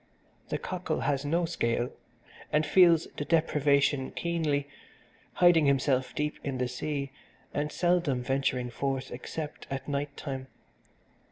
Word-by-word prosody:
The -, -, 0 dB
cockle 180 Hz, -4 st, -3 dB
has 140 Hz, 0 st, 0 dB
no 170 Hz, +4 st, +1 dB
scale, 120 Hz, -7 st, -1 dB, 0.6 s
and 150 Hz, +1 st, +3 dB
feels 170 Hz, 0 st, +6 dB
the -, -, -1 dB
deprivation 145 Hz, -4 st, +2 dB
keenly, 155 Hz, -4 st, -1 dB, 0.7 s
hiding 175 Hz, -4 st, +5 dB
himself 130 Hz, -1 st, +1 dB
deep 150 Hz, 0 st, -2 dB
in 135 Hz, -2 st, -2 dB
the 125 Hz, 0 st, 0 dB
sea 140 Hz, +2 st, -3 dB, 0.4 s
and 150 Hz, +1 st, -1 dB
seldom 175 Hz, -8 st, +1 dB
venturing 130 Hz, -2 st, 0 dB
forth 135 Hz, 0 st, -2 dB
except 150 Hz, +5 st, -6 dB
at 135 Hz, 0 st, -4 dB
night 140 Hz, 0 st, -3 dB
time. 135 Hz, -2 st, -5 dB
145 Hz, 125 wpm, -29 LUFS, 135-160 Hz, 0.7 s, feels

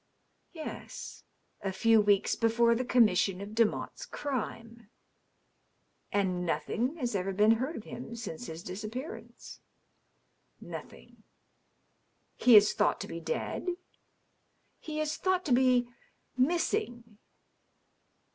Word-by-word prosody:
" -, -, -45 dB
Yes. 320 Hz, -3 st, -8 dB, 0.4 s
A 195 Hz, -2 st, -2 dB
few 225 Hz, +3 st, +4 dB
weeks 205 Hz, -1 st, +3 dB
before 235 Hz, +1 st, +3 dB
the 240 Hz, +2 st, 0 dB
commission 210 Hz, -6 st, +3 dB
of 200 Hz, +1 st, -6 dB
Demotte's 225 Hz, -1 st, 0 dB
crime." 230 Hz, -4 st, -5 dB, 1.2 s
"And 185 Hz, -3 st, 0 dB
nothing 240 Hz, -, -1 dB
has 245 Hz, -8 st, -3 dB
ever 195 Hz, 0 st, -1 dB
been 210 Hz, +3 st, +4 dB
heard 260 Hz, +8 st, 0 dB
of 220 Hz, -, -7 dB
him 235 Hz, 0 st, -8 dB
since 225 Hz, -9 st, -6 dB
his 165 Hz, +1 st, -7 dB
disappear 220 Hz, -, -5 dB
ance?" -, -, -12 dB, 1.0 s
"Nothing." -, -, -10 dB, 0.6 s
" -, -, -44 dB
He 245 Hz, -2 st, +8 dB
is 210 Hz, 0 st, +7 dB
thought -, -, +1 dB
to -, -, -5 dB
be -, -, -6 dB
dead 480 Hz, -, -3 dB, 0.4 s
?" -, -, -45 dB
" -, -, -44 dB
He 310 Hz, -1 st, -5 dB
is 310 Hz, 0 st, -1 dB
thought 370 Hz, 0 st, 0 dB
to 275 Hz, -, +2 dB
be 250 Hz, -1 st, +4 dB, 0.2 s
— -, -, -42 dB, 0.2 s
missing." 250 Hz, -, -1 dB
230 Hz, 130 wpm, -30 LUFS, 205-255 Hz, 1.2 s, He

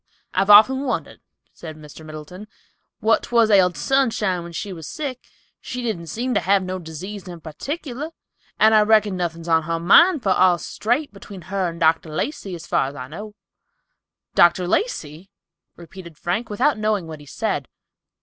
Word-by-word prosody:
"I've 195 Hz, +2 st, +1 dB
often 220 Hz, +6 st, +7 dB
wondered," 275 Hz, -3 st, -4 dB, 0.3 s
said 155 Hz, -2 st, -10 dB
Mr. 155 Hz, +1 st, -13 dB
Middleton, 155 Hz, +6 st, -10 dB, 0.5 s
"what 225 Hz, +1 st, +3 dB
'twas 230 Hz, -2 st, +2 dB
ailded 180 Hz, -5 st, +4 dB
Sunshine 215 Hz, -, +1 dB
when 170 Hz, 0 st, -9 dB
she 195 Hz, +3 st, -5 dB
was 165 Hz, -3 st, -9 dB
sick. 270 Hz, -5 st, -6 dB, 0.3 s
She 250 Hz, 0 st, -6 dB
didn't 180 Hz, -8 st, -3 dB
seem 245 Hz, -, -2 dB
to -, -, +3 dB
have 195 Hz, +2 st, +2 dB
no 185 Hz, 0 st, -4 dB
disease 180 Hz, +5 st, -8 dB
in 175 Hz, -2 st, -8 dB
particular, 275 Hz, -, -6 dB, 0.5 s
and 220 Hz, +1 st, +6 dB
I 215 Hz, -, +6 dB
reckon 210 Hz, -2 st, +3 dB
nothin's 170 Hz, -2 st, -4 dB
on 165 Hz, -1 st, +3 dB
her 165 Hz, +1 st, -3 dB
mind, 305 Hz, -, +5 dB
for 195 Hz, -, +1 dB
all's 180 Hz, -2 st, +3 dB
straight 245 Hz, +5 st, -1 dB
between 200 Hz, -1 st, -11 dB
her 190 Hz, -3 st, 0 dB
and 170 Hz, 0 st, -9 dB
Dr. 160 Hz, 0 st, +2 dB
Lacey, 190 Hz, -, -4 dB
as 170 Hz, 0 st, -10 dB
far -, -, +1 dB
as 140 Hz, -, -8 dB
I 125 Hz, -2 st, -7 dB
know." 210 Hz, +6 st, -9 dB, 1.0 s
"Dr. 175 Hz, +1 st, +4 dB
Lacey!" 175 Hz, -, -2 dB, 0.5 s
repeated 170 Hz, -1 st, -12 dB
Frank, 200 Hz, +7 st, -2 dB
without 245 Hz, +4 st, +1 dB
knowing 215 Hz, -4 st, 0 dB
what 160 Hz, -2 st, -9 dB
he 145 Hz, -, -15 dB
said. -, -, -3 dB
185 Hz, 170 wpm, -22 LUFS, 165-220 Hz, 1.0 s, often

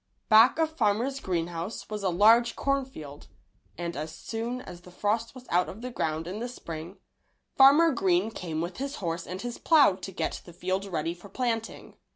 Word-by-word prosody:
Back 225 Hz, +5 st, +7 dB
of 320 Hz, -1 st, +1 dB
Farmer 230 Hz, +1 st, +1 dB
Greenes 175 Hz, -2 st, -1 dB
house 170 Hz, +5 st, -5 dB
was 210 Hz, -1 st, -5 dB
a 195 Hz, -, +1 dB
large 225 Hz, +6 st, +5 dB
cornfield, 260 Hz, -, -3 dB, 0.5 s
and 170 Hz, 0 st, -4 dB
as 155 Hz, +2 st, -4 dB
soon 230 Hz, +9 st, -4 dB
as 175 Hz, -7 st, -10 dB
the 180 Hz, -, -14 dB
frost 215 Hz, +6 st, -1 dB
was 255 Hz, -1 st, -11 dB
out 180 Hz, +1 st, +2 dB
of 220 Hz, +5 st, -9 dB
the 250 Hz, -, -4 dB
ground 160 Hz, -7 st, -2 dB
in 185 Hz, +5 st, -5 dB
the 240 Hz, -, -3 dB
Spring, 170 Hz, -6 st, -8 dB, 0.6 s
Farmer 290 Hz, +5 st, +7 dB
Green 195 Hz, -3 st, +1 dB
came 165 Hz, -7 st, -4 dB
with 175 Hz, +2 st, -5 dB
his 275 Hz, +2 st, -4 dB
horse 170 Hz, -, -4 dB
and 185 Hz, +2 st, -5 dB
his 240 Hz, -1 st, -5 dB
plow 305 Hz, -, +5 dB
to 195 Hz, +1 st, -8 dB
get 190 Hz, -, -3 dB
the 175 Hz, -, -13 dB
field 185 Hz, +3 st, -2 dB
ready 165 Hz, -3 st, -2 dB
for 175 Hz, +3 st, -14 dB
planting. 225 Hz, 0 st, -3 dB
200 Hz, 190 wpm, -28 LUFS, 175-240 Hz, 0.6 s, Back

